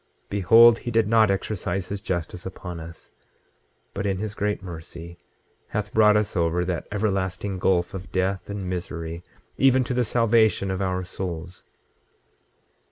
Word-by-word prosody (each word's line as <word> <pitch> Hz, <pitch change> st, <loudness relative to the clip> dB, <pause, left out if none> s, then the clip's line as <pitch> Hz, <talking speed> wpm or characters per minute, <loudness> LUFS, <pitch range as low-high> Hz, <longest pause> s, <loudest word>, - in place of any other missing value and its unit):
Behold, 115 Hz, +4 st, +6 dB
he -, -, -5 dB
did 115 Hz, -2 st, +2 dB
not 110 Hz, -1 st, +4 dB
exercise 95 Hz, -2 st, -2 dB
his 100 Hz, 0 st, -4 dB
justice 90 Hz, -2 st, -4 dB
upon 90 Hz, -2 st, -7 dB
us, 80 Hz, 0 st, -11 dB, 0.8 s
but 100 Hz, -, -3 dB
in 95 Hz, -1 st, 0 dB
his 105 Hz, +1 st, -4 dB
great 105 Hz, -1 st, -2 dB
mercy 85 Hz, 0 st, -9 dB, 0.5 s
hath 105 Hz, -1 st, -4 dB
brought 105 Hz, -1 st, +5 dB
us 105 Hz, -1 st, -1 dB
over 85 Hz, 0 st, +1 dB
that 90 Hz, -2 st, -3 dB
everlasting 95 Hz, -2 st, -1 dB
gulf 90 Hz, -2 st, +1 dB
of 95 Hz, -1 st, -7 dB
death 95 Hz, +1 st, -1 dB
and 100 Hz, -2 st, -4 dB
misery, 85 Hz, -2 st, -5 dB, 0.4 s
even 130 Hz, -1 st, +5 dB
to 125 Hz, -, -3 dB
the 125 Hz, 0 st, +2 dB
salvation 110 Hz, -4 st, +2 dB
of 95 Hz, 0 st, -2 dB
our 95 Hz, -1 st, -1 dB
souls. 90 Hz, -1 st, -6 dB
95 Hz, 150 wpm, -24 LUFS, 90-105 Hz, 0.8 s, Behold